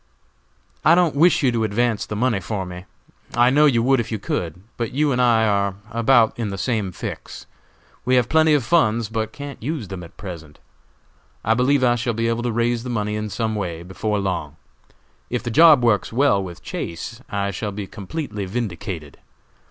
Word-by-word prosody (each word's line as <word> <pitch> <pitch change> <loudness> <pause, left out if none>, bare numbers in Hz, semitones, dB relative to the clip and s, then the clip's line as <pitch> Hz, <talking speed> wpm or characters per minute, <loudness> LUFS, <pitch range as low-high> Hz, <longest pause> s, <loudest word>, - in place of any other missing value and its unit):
"I 165 - +6
don't 175 -3 +3
wish 165 +2 +4
you 130 - +4
to 115 -2 0
advance 110 +1 0
the 105 - -4
money 115 -1 +1
for 95 0 -4
me. 90 0 -8 0.5
I 120 +1 +5
know 150 +2 +5
you 120 -5 +2
would 135 +1 +3
if 115 - -3
you 110 - -1
could; 90 -3 -4
but 115 -1 -3
you 145 +1 +2
and 125 -1 +1
I 115 -2 +4
are 100 -2 +1 0.2
about 115 0 +3
in 110 -3 -1
the 100 - -5
same 105 -1 -1
fix. - - -7 0.6
We 130 +1 +2
have 125 -2 +3
plenty 160 +1 +4
of 140 - +1
funds, 115 -7 +2
but 110 -1 -2
can't 140 +2 -8
use 135 - -4
them 95 -2 -6
at 85 - -14
present. 80 -6 -9 0.9
I 110 - +4
believe 130 +3 +2
I 120 -1 +4
shall 120 -1 -1
be 115 +1 0
able 115 0 -1
to 120 0 -1
raise 120 +1 0
the 125 - -6
money 105 -3 -1
in 105 0 -3
some 110 +1 -2
way 85 -5 -4
before 105 +4 -2
long. 90 -7 -3 0.7
If 125 -1 -2
the 120 - -3
job 155 -1 +7
works 115 -4 +2
well 120 -4 +3
with 90 -2 -9
Chase 120 +9 -6
I 100 0 -1
shall 105 +3 -4
be 100 0 -5
completely 105 - -5
vindicated. 95 - -5
115 Hz, 200 wpm, -22 LUFS, 100-125 Hz, 0.9 s, job